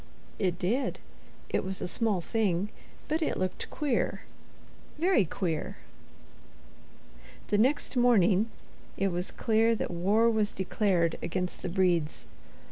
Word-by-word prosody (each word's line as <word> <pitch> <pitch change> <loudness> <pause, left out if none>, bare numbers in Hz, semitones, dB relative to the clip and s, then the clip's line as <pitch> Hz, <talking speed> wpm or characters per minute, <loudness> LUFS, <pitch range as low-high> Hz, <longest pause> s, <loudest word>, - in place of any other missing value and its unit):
It 180 -3 0
did. 215 +9 0 0.5
It - - 0
was 190 0 -3
a - - -3
small 210 -1 0
thing. 200 -1 0 0.4
But 315 +1 0
it 310 - 0
looked 185 0 -3
queer, 285 -5 -1 0.8
Very 335 - +3
queer. 165 -1 -3 1.7
The 205 - +2
next 270 +4 +1
morning, 220 -4 +4 0.5
it 195 0 +1
was 180 0 -2
clear 225 +1 +2
that - - -3
war 200 +7 +3
was 220 -2 +1
declared 185 -3 +1
against 180 +1 -3
the - - -3
Bredes. 170 - +1
195 Hz, 125 wpm, -29 LUFS, 180-230 Hz, 1.7 s, morning